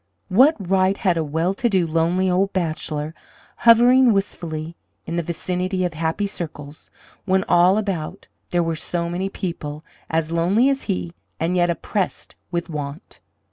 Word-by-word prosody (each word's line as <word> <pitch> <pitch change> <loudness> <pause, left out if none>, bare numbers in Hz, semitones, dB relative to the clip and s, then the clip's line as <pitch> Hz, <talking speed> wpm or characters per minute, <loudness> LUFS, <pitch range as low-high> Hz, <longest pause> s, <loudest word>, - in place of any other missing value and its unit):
What 260 - +6
right 190 +1 +2
had 185 -4 +1
a 165 - 0
well 160 +5 0
to 240 +4 0
do, 190 -4 +2
lonely 165 +3 +1
old 190 +2 +1
bachelor 155 -3 -2 0.4
hovering 240 +2 +6
wistfully 170 -5 -3 0.3
in 170 - -4
the 170 - +1
vicinity 180 +3 -2
of 175 - -2
happy 160 +5 -1
circles, 150 -6 -7 0.4
when 190 -1 +2
all 180 +3 +4
about 190 -7 -3 0.2
there 175 -1 +1
were 165 -1 -1
so 170 +2 -3
many 185 +3 -2
people 155 -5 -5 0.2
as 160 0 0
lonely 185 +10 +3
as 275 -1 -1
he, 90 -2 -3 0.3
and 165 +3 0
yet 175 -1 +3
oppressed 185 +3 -2 0.2
with 170 -1 -2
want? 150 +1 -7
175 Hz, 155 wpm, -22 LUFS, 160-195 Hz, 0.4 s, What